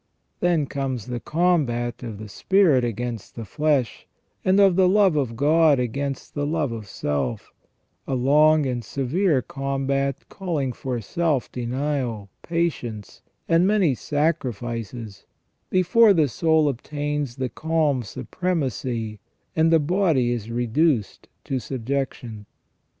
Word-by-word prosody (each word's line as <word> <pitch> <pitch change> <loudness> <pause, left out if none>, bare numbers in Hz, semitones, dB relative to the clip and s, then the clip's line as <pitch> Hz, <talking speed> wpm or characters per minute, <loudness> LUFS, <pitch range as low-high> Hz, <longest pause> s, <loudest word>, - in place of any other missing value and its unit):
Then 175 -4 +2
comes 130 -5 -3
the 120 -1 -4
combat 140 -6 0
of 115 -4 -6
the 110 +1 -8
spirit 160 - +3
against 120 -1 -4
the 115 - -6
flesh, 140 +1 0 0.4
and 190 +2 +3
of 195 -3 +5
the 185 0 +4
love 195 -4 +4
of 130 -6 -1
God 150 +3 +4
against 135 +3 -3
the 145 -1 -2
love 150 -4 -1
of 110 -3 -6
self, 95 - -3 0.6
a 135 - -1
long 150 +4 +4
and 125 -2 -2
severe 140 - 0
combat 135 0 -2
calling 155 -10 -3
for 125 0 -4
self 150 +3 -1
denial, 125 -4 -3
patience, 145 -11 -3 0.3
and 170 +2 +4
many 200 -8 +3
sacrifices 120 - -3 0.4
before 200 +4 +5
the 155 -3 +3
soul 160 +3 +2
obtains 145 0 -3
the 130 -2 -2
calm 155 -4 0
supremacy 125 - -3 0.4
and 160 +1 +3
the 165 - +6
body 155 -6 +2
is 115 -2 -3
reduced 120 - 0 0.2
to 135 - -2
subjection. 125 -4 -4
140 Hz, 125 wpm, -23 LUFS, 120-160 Hz, 0.6 s, the